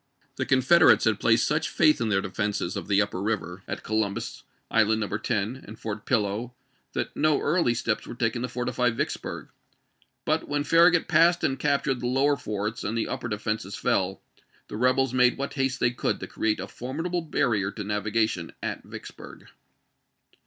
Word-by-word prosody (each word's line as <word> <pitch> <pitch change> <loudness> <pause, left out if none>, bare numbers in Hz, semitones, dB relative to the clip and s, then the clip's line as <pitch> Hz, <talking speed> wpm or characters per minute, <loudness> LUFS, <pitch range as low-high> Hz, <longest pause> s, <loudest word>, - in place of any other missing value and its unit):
The - - -2
Confederates 135 +6 +5
had 110 -2 +2
placed 115 0 +3
such 150 +2 0
faith 155 -5 +3
in 115 - 0
their 95 -2 +2
defenses 100 -2 -2
of - - -5
the 100 0 +4
upper 100 -2 -5
river, 100 -3 -3
at - - -5
Co 110 - -6
lumbus, 100 -2 -2 0.3
Island 110 0 +3
No. 105 -1 -2
10, 110 +3 -2
and 110 +2 -10
Fort 110 -1 -6
Pillow, 115 +2 0 0.4
that - - -3
no 155 -2 +2
early 150 -7 +1
steps 115 -2 -2
were - - -7
taken 120 0 -1
to 125 - -1
fortify 125 0 0
Vicksburg; 115 - -4 0.8
but - - 0
when 145 0 0
Farragut 170 +2 +4
passed 170 +1 +4
and 135 0 0
captured 140 -2 +1
the 120 - -2
lower 135 +3 +3
forts 105 -3 -4
and 110 +3 -2
the 115 - 0
upper - - -4
defenses 105 -2 -3
fell, - - 0 0.5
the - - -6
rebels 130 +2 +2
made 125 -1 +4
what 140 +1 -4
haste 135 0 -1
they 120 - +2
could 125 - -2
to - - -5
create 110 -1 -1
a - - -5
formidable 165 +8 -3
bar 150 -4 0
rier 100 -3 0
to 105 +1 -6
navigation 105 -3 -1
at - - -3
Vicksburg. - - -11
115 Hz, 180 wpm, -26 LUFS, 105-135 Hz, 0.8 s, Confederates